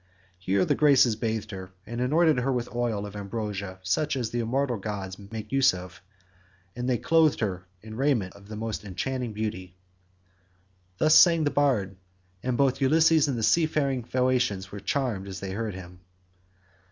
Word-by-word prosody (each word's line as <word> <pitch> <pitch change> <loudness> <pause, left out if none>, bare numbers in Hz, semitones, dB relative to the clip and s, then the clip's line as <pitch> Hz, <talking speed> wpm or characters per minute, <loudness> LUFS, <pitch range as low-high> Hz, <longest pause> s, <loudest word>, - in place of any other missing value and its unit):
Here 95 0 +1
the - - +2
Graces 135 -6 +4
bathed 110 -1 -3
her, 95 -1 -8
and 120 +1 -5
anointed 155 +2 +3
her 130 +2 0
with 125 -2 -3
oil 115 -4 -1
of 105 0 -9
ambrosia 100 -2 -5
such 140 +11 0
as 120 -4 -2
the 120 - -2
immortal 125 +2 0
gods 100 -1 -5
make 105 +2 -8
use 135 -7 +4
of, 90 0 -10 0.7
and 125 +1 -3
they 125 - +2
clothed 160 +5 +3
her 95 -4 -3 0.2
in 110 0 -9
raiment 125 -8 0
of 100 0 -16
the 105 - -7
most 110 -1 -4
enchanting 120 +6 -3
beauty. 95 -4 -5 1.2
Thus 155 +7 +4
sang 165 -2 +7
the 145 - +1
bard, 110 -10 +1 0.4
and 125 +1 -1
both 140 -1 +2
Ulysses 160 +2 +4
and 135 -4 -1
the 115 - -3
seafaring 140 0 +2
Phaeacians 120 -6 0
were 105 - -7
charmed 115 -7 -2
as 95 -1 -6
they 95 -1 -5
heard 105 0 -3
him. 90 -1 -11
115 Hz, 170 wpm, -26 LUFS, 100-135 Hz, 1.2 s, sang